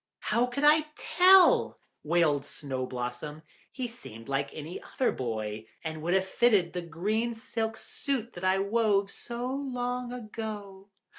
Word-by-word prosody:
"How 235 +3 +3
could 250 +4 -3
I 305 +1 +6
tell," 370 +1 +6 0.3
wailed 155 -3 +2
Snow 130 -4 -5
blossom. 125 +5 -5 0.3
"He 255 -2 -3
seemed 115 - -11
like 140 0 -1
any 155 +3 -7
other 260 - 0
boy, 110 -3 -4 0.2
and 160 -1 -4
would 175 +4 +1
just 190 0 +2
have - - -15
fitted 205 -8 +4
the 180 - -2
green 210 +8 -1
silk 225 0 -3
suit 245 -4 -4
that 175 - -9
I 185 0 +3
wove 200 -1 +2
so 240 +1 -5
long 250 -2 -2
ago." 215 -4 -7
200 Hz, 150 wpm, -29 LUFS, 155-240 Hz, 0.3 s, I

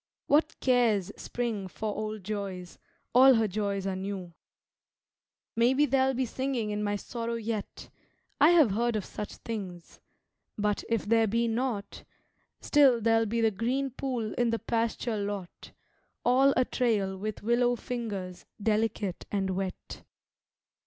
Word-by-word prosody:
What 305 +2 +2
cares 225 -7 +2
Spring 230 -5 -3
for 210 +3 -4
old 215 -1 -4
joys, 195 -3 -5 0.3
all 260 +2 +8
her 225 -1 +2
joys 200 -1 -2
are 195 -1 -1
new. 190 -2 -5 1.2
Maybe 255 +5 +4
there'll 265 -1 +2
be 260 +1 0
singing 250 -3 -2
in 210 0 -2
my 205 0 0
sorrow 230 +2 -4
yet 225 -2 -5 0.5
I 295 +3 +7
have 320 - +5
heard 235 +3 0
of 210 - -2
such 210 - -7
things 190 -7 -7 0.6
but, 210 -1 0
if 230 -2 0
there 225 +1 +3
be 230 +3 +1
not, 230 -3 -3 0.6
Still 275 -5 +5
there'll 225 0 +2
be 230 +2 0
the 225 -1 +3
green 255 +6 -1
pool 245 -4 -3
in 240 -1 +3
the 230 - +1
pasture 230 0 -1
lot, 200 -3 -5 0.5
All 265 +3 +5
a 255 - +4
trail 210 -8 0
with 210 +2 -5
willow 240 +2 +2
fingers, 205 -7 -5
delicate 210 -3 -1
and 195 -2 0
wet. 185 0 -5
225 Hz, 140 wpm, -29 LUFS, 200-245 Hz, 1.2 s, all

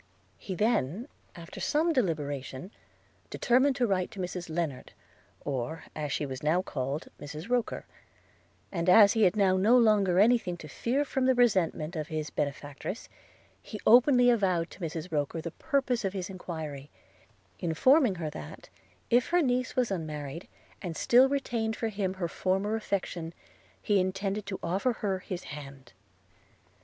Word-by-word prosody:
He 190 - -5
then, 215 - 0 0.3
after 170 -1 -10
some 325 +3 +1
deliberation, 150 - -2 0.6
determined 260 +3 +2
to 250 -3 +2
write 185 -4 0
to 205 - -11
Mrs 180 -1 -4
Lennard, 160 -5 -3 0.5
or, 140 +3 -3
as 150 -2 -3
she 150 - -1
was 130 -2 -6
now 165 +5 +2
called, 140 -1 -4
Mrs 150 +6 -8
Roker; 245 -2 0 0.4
– - - -35
and, 170 -1 0
as 200 +2 +8
he 220 -2 +4
had 180 - +3
now 190 -3 +3
no 220 +6 +5
longer 210 -6 +4
any 235 +5 +6
thing 180 -5 -5
to 155 - -10
fear 255 - -1
from 265 -2 0
the 260 - +4
resentment 190 -8 +2
of 155 -1 -3
his 155 -1 -4
benefactress, 145 - -4 0.5
he 215 - -8
openly 245 +1 +6
avowed 185 -7 +1
to - - -13
Mrs 165 0 -5
Roker 150 +1 -1
the 170 +1 -5
purpose 265 - -1
of 195 -1 -1
his 190 -1 -4
enquiry; 155 -6 -6 0.7
informing 235 - +3
her 160 -3 -4
that, 75 - -10 0.4
if 240 +1 +4
her 350 0 +3
niece 250 -1 0
was 250 -4 +1
unmarried, 155 -2 -5 0.3
and 170 -3 -5
still 255 +3 +5
retained 235 -5 -1
for 225 - -2
him 195 -3 -2
her 180 -2 -2
former 195 +5 -1
affection, 180 -6 -3 0.4
he 205 -2 +2
intended 195 +2 -2
to 190 - -4
offer 195 +9 0
her 190 -2 0
his 180 -1 -6
hand. 135 -3 -10
185 Hz, 160 wpm, -29 LUFS, 160-230 Hz, 0.7 s, as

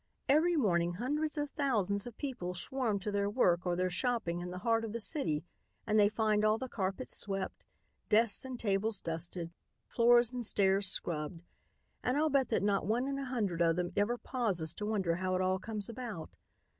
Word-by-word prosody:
Every 315 +5 +4
morning 175 - +2
hundreds 295 - -2
of 290 -1 -2
thousands 205 -7 0
of 235 - -10
people 240 -11 -4
swarm 230 +2 -1
to 210 - -3
their 200 0 +1
work 180 -6 +2
or 175 - +1
their 185 +1 0
shopping 215 -4 0
in 175 0 -5
the 180 - -6
heart 225 -1 +3
of 220 -2 -4
the 235 - -2
city 205 - 0 0.4
and 215 -1 +3
they 205 0 +6
find 215 -1 +1
all 215 +1 +4
the 260 - -4
carpets 195 +1 -3
swept, 195 -1 -3 0.4
desks 220 0 +3
and 260 -2 -6
tables 205 +1 0
dusted, 165 +1 -5 0.3
floors 240 0 +4
and 250 -1 -4
stairs 195 -2 +2
scrubbed, 165 -2 -2 0.6
and 250 +3 +1
I'll 310 0 +2
bet 270 -2 +2
that 220 - +1
not 200 -2 +1
one 240 +5 +1
in 275 0 -2
a 275 - -3
hundred 210 -10 -1
of 165 -1 +4
them 175 0 -2
ever 215 +4 +1
pauses 200 -12 -1
to 210 - -4
wonder 190 -6 0
how 185 0 -1
it 185 - +1
all 185 0 +1
comes 210 -1 -4
about. 230 -8 -6
210 Hz, 195 wpm, -33 LUFS, 185-245 Hz, 0.6 s, they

